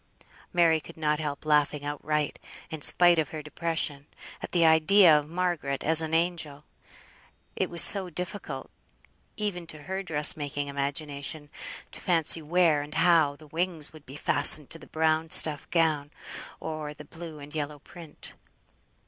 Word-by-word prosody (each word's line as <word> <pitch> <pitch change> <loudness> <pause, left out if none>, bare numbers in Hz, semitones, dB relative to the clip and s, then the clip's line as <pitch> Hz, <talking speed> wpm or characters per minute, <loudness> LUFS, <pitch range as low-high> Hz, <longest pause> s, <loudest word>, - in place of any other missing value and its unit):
Mary 165 -3 +3
could 140 - -13
not 150 -1 -1
help 150 -1 -5
laughing 150 -1 +1
outright, 150 +1 -3 0.3
in 160 -2 -7
spite 175 +2 +5
of 155 - -1
her 155 -1 -7
depression, 150 -2 -3 0.3
at - - -7
the 170 -2 +2
idea 160 +2 +6
of 150 0 -9
Margaret 170 -6 -2
as 160 +1 +6
an 160 -1 -4
angel; 160 -3 -2 0.9
it - - -2
was 170 -1 +6
so 195 -3 +6
difficult 170 -5 -7 0.7
(even 185 -5 -4
to 155 -2 -9
her 190 +3 -4
dress 155 -5 +5
making 145 -1 -5
imagination) 145 +1 -4 0.4
to - - -8
fancy 165 -2 +1
where, 160 -1 +2
and 150 +1 -9
how, 165 -5 +3
the 155 - -17
wings 160 0 -3
would 155 -2 -16
be 135 - -11
fastened 145 0 +2
to 165 - -4
the - - -14
brown 160 0 0
stuff 155 -2 +3
gown, 155 -4 0 0.5
or 155 -2 -6
the 150 - -12
blue 165 0 -10
and 145 +1 -12
yellow 150 -1 -4
print. 160 +2 -11
155 Hz, 155 wpm, -27 LUFS, 145-170 Hz, 0.9 s, idea